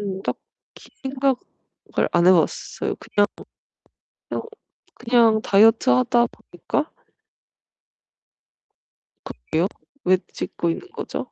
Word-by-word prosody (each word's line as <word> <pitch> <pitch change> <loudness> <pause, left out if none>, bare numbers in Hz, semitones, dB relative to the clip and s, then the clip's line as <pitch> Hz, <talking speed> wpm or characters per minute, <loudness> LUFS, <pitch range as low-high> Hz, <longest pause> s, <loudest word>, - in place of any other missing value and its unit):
음 195 -2 -4
딱히 - - -9
생각을 270 -1 -2 0.6
안 175 0 +3
해 185 - +8
봤어요. 175 - 0
그냥 205 0 +1 1.0
그냥 - - -3 0.5
그냥 230 -2 +3
다이어트 220 - +5
하다 125 - +3
보니까 175 -3 -4 2.3
그러게요. - - -9 0.7
왜 185 +1 +5 0.2
찍고 170 - -3
있는 165 - -4
거죠? - - -6
205 Hz, 195 characters per minute, -22 LUFS, 180-240 Hz, 2.3 s, 해